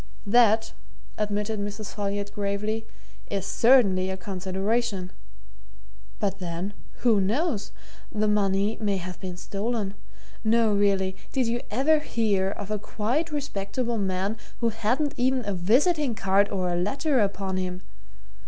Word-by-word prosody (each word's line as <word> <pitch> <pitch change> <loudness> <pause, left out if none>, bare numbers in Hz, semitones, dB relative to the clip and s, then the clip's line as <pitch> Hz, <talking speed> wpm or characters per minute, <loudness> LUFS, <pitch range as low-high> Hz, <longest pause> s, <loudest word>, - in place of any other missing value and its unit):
"That," 225 0 +4 0.4
admitted 210 +1 -1
Mrs. 205 +1 -5
Folliot 205 0 -2
gravely, 210 +2 -2 0.4
"is 195 -1 -2
certainly 200 -5 +4
a 190 - -3
consideration. 190 +2 -1 1.1
But 195 -1 -1
then, 180 +2 -4 0.3
who 225 -5 +4
knows? 230 - 0 0.4
the 215 0 +1
money 205 0 +2
may 200 -2 +1
have 180 0 -6
been 180 -2 -6
stolen. 205 +1 -2 0.5
Now, 225 0 +4
really, 195 -2 +2 0.2
did 260 -2 +1
you 235 +1 0
ever 285 +8 +3
hear 210 -9 +1
of 200 +1 -6
a 210 - 0
quite 250 +12 -1
respectable 240 -4 -2
man 195 +2 -1 0.2
who 235 - +2
hadn't 240 +7 0
even 255 -1 +1
a 205 - -1
visiting 250 - +2
card 195 +1 +3
or 185 -2 -1
a 175 - +1
letter 270 - +1
upon 195 -2 0
him? 185 0 -3
205 Hz, 135 wpm, -26 LUFS, 195-230 Hz, 1.1 s, That